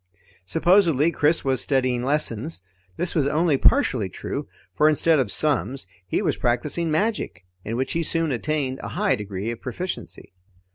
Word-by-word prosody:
Supposedly, 165 - +3
Chris 155 0 +1
was 130 -2 +1
studying 130 -3 0
lessons. 140 - +1 0.4
This 175 0 -2
was 145 -4 +1
only 155 +1 +2
partially 130 - +3
true, - - -5 0.3
for 150 +10 +4
instead 155 +1 +3
of 120 -6 0
sums, 135 -5 +1 0.2
he 205 - -1
was 155 -7 0
practising 145 +7 -1
magic, 155 - -1 0.2
in 115 - -4
which 130 +2 -2
he 170 - 0
soon 165 -1 0
attained 135 +1 -2
a - - -6
high 205 0 +2
degree 105 +1 -4
of 120 - -8
proficiency. 130 - -6
145 Hz, 155 wpm, -23 LUFS, 125-165 Hz, 0.4 s, for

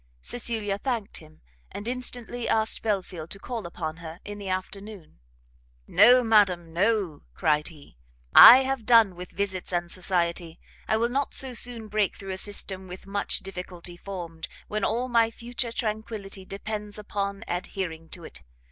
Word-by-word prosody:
Cecilia 220 -4 -2
thanked 235 -4 -3
him, 155 -1 -15 0.3
and 205 - -7
instantly 245 -1 -3
asked 220 0 +1
Belfield 185 -6 -3
to 200 - -7
call 225 -2 -5
upon 160 -2 -5
her 165 0 -9
in 205 0 -7
the 200 -2 -6
afternoon. 190 - -6 0.7
"No, 250 - +6
madam, 190 -7 +3
no," 195 -3 +1
cried 150 - +1
he, 145 - -14 0.4
"I 255 +3 +11
have 265 -4 -3
done 225 -6 +6
with 180 +1 -8
visits 190 -2 -3
and 175 -1 -1
society! 170 -2 0 0.3
I 220 - +2
will 235 +1 +1
not 275 +3 -1
so 265 -1 +1
soon 235 -2 -2
break 210 -1 0
through 195 -1 -7
a 190 - -1
system 190 -2 +1
with 180 +1 -10
much 200 +1 -1
difficulty 180 -2 -8
formed, 175 -3 -7 0.2
when 215 -1 -2
all 240 +3 0
my 230 -2 +3
future 235 +1 -4
tranquility 215 -4 -4
depends 210 +1 -5
upon 200 -1 -4
adhering 175 -2 -4
to 175 - -9
it. - - -9
200 Hz, 155 wpm, -26 LUFS, 180-225 Hz, 0.7 s, I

